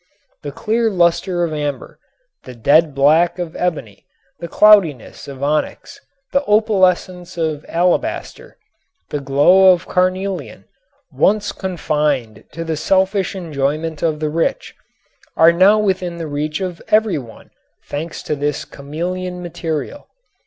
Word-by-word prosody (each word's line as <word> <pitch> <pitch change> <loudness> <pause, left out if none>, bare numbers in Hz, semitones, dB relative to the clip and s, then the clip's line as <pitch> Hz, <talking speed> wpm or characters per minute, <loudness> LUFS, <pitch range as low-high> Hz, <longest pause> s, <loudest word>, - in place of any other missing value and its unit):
The - - -6
clear 225 +1 0
luster 175 -1 +1
of 165 -2 -2
amber, 145 -2 -5 0.5
the 125 - -10
dead 145 +5 +3
black 155 +6 +3
of 175 -2 -5
ebony, 140 - -4 0.3
the 170 - -6
cloudiness 185 - +3
of 140 -1 -8
onyx, 150 +2 -2 0.3
the 275 +1 +2
opalescence 185 -5 +1
of 155 -2 -2
alabaster, 175 +2 -2 0.5
the 145 - -2
glow 145 +8 +5
of 180 -1 -1
carnelian 185 +1 -2 0.5
once 205 0 +1
confined 150 - -2
to 165 +2 -6
the 160 -1 -3
selfish 190 +4 +1
enjoyment 155 -2 -3
of 155 -2 0
the 155 -1 -1
rich 165 +2 -2 0.6
are 165 +1 +7
now 190 +5 +5
within 185 -4 -1
the 165 - -5
reach 150 +3 -3
of 180 -3 -5
every 215 -6 +2
one, 115 -4 -14 0.3
thanks 155 +3 -6
to 150 - -2
this 145 0 -2
chameleon 180 +5 -5
material. 165 - -5
170 Hz, 130 wpm, -18 LUFS, 150-185 Hz, 0.6 s, are